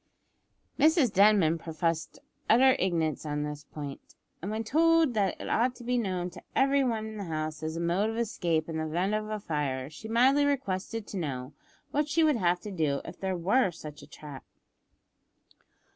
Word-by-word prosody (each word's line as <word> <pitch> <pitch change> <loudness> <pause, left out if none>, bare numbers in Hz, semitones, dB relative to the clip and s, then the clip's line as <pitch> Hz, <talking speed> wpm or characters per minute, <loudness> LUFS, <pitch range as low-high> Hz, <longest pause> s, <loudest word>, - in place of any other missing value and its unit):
Mrs 310 - +4
Denman 195 -5 +4
professed 165 0 -2 0.3
utter 260 +4 +6
ignorance 165 -4 0
on 150 -1 -2
this 150 -1 -6
point, 145 -1 -9 0.3
and 185 - -4
when 220 +1 -2
told 325 +3 +3
that 200 -4 0
it - - -6
ought 245 +2 +1
to 240 - -12
be 250 +1 0
known 180 -4 -2
to 175 - -11
every 275 +1 +3
one 225 -4 -1
in 220 0 -7
the 200 - -5
house 155 -2 -4
as 160 0 -3
a - - -2
mode 175 +5 +1
of 225 - -4
escape 170 -9 -1
in 160 -1 -4
the 160 - -1
event 180 +6 0
of 215 -1 -3
fire, 140 -3 -2
she 220 +8 -9
mildly 255 +6 +4
requested 225 -6 -1
to 200 - -6
know 135 -5 -4 0.4
what 295 +1 0
she 325 +2 +3
would 305 -5 +3
have 180 -3 +1
to 210 - -7
do 155 -6 0
if - - -9
there 190 -1 -2
were 195 +6 +2
such 150 -3 -10
a - - -13
trap. 145 -3 -10
190 Hz, 190 wpm, -29 LUFS, 155-230 Hz, 0.4 s, utter